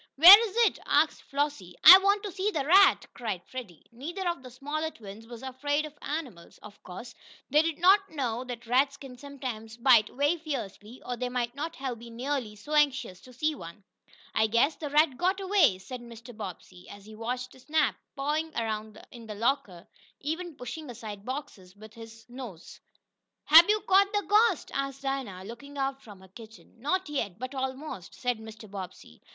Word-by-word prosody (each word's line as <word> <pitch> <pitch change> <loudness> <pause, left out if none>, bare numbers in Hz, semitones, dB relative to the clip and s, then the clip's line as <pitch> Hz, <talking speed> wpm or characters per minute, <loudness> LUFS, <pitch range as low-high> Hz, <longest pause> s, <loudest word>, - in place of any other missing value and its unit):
"Where 395 +9 +10
is 390 - -14
it?" - - 0
asked - - +2
Flossie. 280 -11 -3
"I 370 +4 +12
want 400 +1 +2
to 410 - -5
see 385 +3 -1
the 300 -9 -2
rat!" 380 +4 +6
cried 210 -7 -4
Freddie. 230 -11 -9
Neither 340 +10 -5
of 340 -5 -2
the 255 - -11
smaller 290 +5 -4
twins 220 -4 -12
was 235 +1 -10
afraid 290 +3 -1
of 305 - -10
animals. 270 - -6
Of 210 -1 -13
course, 230 +7 -10 0.4
they 300 +2 +6
did 325 -1 -2
not 390 +3 +4
know 250 -5 -3
that 240 -2 -7
rats 270 +4 +2
can 270 -3 -11
sometimes 245 -5 -7
bite 235 -3 +5
very 290 +6 0
fiercely, 245 - -7
or 250 - -3
they 250 +1 -3
might 245 -1 -2
not 300 +3 -5
have 255 -3 -5
been 235 0 -11
nearly 250 -4 -3
so 250 +9 -8
anxious 265 -11 +1
to 255 - -15
see 305 +5 -1
one. 170 - -11 0.5
"I 220 - +3
guess 235 +8 +2
the 300 - -6
rat 295 -2 +3
got 375 +2 +1
away," 380 - +3
said 240 +7 -9
Mr. 235 0 -12
Bobbsey, 185 -3 -9
as 200 0 -12
he 215 - -12
watched 245 +3 -4
Snap 305 +1 +1 0.2
pawing 300 +3 -2
around 220 -1 -4
in 235 -2 -12
the 210 - -6
locker, 205 -6 -2 0.3
even 325 +3 -4
pushing 290 +4 -8
aside 210 -4 -8
boxes 210 -9 -7
with 215 +1 -14
his 225 -1 -13
nose. 240 -9 -10 0.6
"Hab 330 +5 +8
yo' 425 0 +3
cotched 395 0 +3
de 410 0 +1
ghost?" 420 0 +2
asked 275 0 -4
Dinah, 260 -9 -4
looking 240 +7 -10
out 270 0 -2
from 205 -6 -14
her 190 - -15
kitchen. 220 +3 -15
"Not 370 +7 -1
yet 225 -11 -3
but 255 +3 -6
almost," 265 - -5
said 245 -2 -2
Mr. 220 0 -11
Bobbsey. 185 - -10
255 Hz, 185 wpm, -28 LUFS, 220-300 Hz, 0.6 s, I